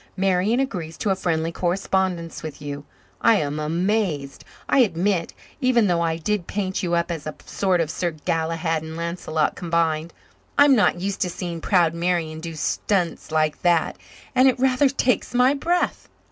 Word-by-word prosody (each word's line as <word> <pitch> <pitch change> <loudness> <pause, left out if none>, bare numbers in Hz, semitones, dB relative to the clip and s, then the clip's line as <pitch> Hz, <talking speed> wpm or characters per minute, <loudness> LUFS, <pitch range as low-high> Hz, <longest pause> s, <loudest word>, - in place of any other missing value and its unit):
Marian 195 +5 +2
agrees 175 -12 -3
to 205 - 0
a - - +2
friendly 165 -3 -1
correspondence 180 -1 -1
with 155 -2 -7
you. 145 0 -6 0.4
I 230 - +5
am 150 -4 -1
amazed, 165 -3 -1 0.2
I - - +3
admit 185 -5 +1 0.3
even 255 -4 +3
though 175 -3 +2
I 165 -1 0
did 185 +2 -2
paint 190 -2 -2
you 175 -2 0
up 170 +1 0
as 160 -3 -5
a 155 - -5
sort 190 -3 0
of 160 -2 0
Sir 175 - -1
Galahad 165 +1 -1
and 160 +1 -7
Lancelot 170 -2 -1
combined. 165 -1 0 0.5
I'm 285 -1 +7
not 190 -5 +3
used 195 +2 -3
to 180 - +1
seeing 170 -1 -5
proud 170 -3 +3
Marian 170 -2 -1
do 165 0 -6
stunts 175 +2 -1
like 155 -1 +1
that, 170 -2 +2 0.4
and 260 0 +5
it 260 - +3
rather 265 +2 +3
takes 255 -2 0
my 250 +2 +5
breath." 345 +5 -1
175 Hz, 170 wpm, -23 LUFS, 160-205 Hz, 0.5 s, I'm